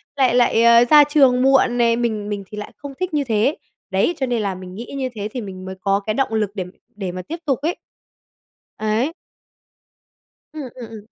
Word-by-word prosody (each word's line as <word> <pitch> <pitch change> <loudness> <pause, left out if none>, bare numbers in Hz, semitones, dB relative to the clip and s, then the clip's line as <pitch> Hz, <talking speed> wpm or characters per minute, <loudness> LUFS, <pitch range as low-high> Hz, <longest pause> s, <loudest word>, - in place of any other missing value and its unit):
lại 260 -4 +3
lại, 240 -2 +4
ơ, 235 0 +7
ra 300 -1 +9
trường 275 -4 +4
muộn 265 -2 +4
nè, 235 -1 +3
mình 220 -3 -2
mình 205 -1 -3
thì 210 - -10
lại 210 - -6
không 285 -1 -8
thích 370 -2 -3
như 295 -1 +1
thế. 230 +3 +1 0.3
Đấy, 195 - +2
cho 265 - 0
nên 240 -3 -1
là 200 -2 -2
mình 185 0 -10
nghĩ 235 +6 -8
như 260 -1 -2
thế 205 -1 -3
thì 250 - -3
mình 185 -3 -8
mới 190 0 -6
có 195 0 +2
cái 215 +1 -3
động 255 -1 -1
lực 215 -2 +1
để 185 -3 -3 0.3
để 195 -3 -4
mà 185 +1 -6
tiếp 320 - -6
tục 275 -4 0
ấy. 330 +4 -1 1.0
Ấy. 220 +8 0 1.4
Ừm, 310 -2 -6
ừm, 245 -3 -9
ừm. 215 -2 -10
235 Hz, 215 wpm, -20 LUFS, 205-270 Hz, 1.4 s, ra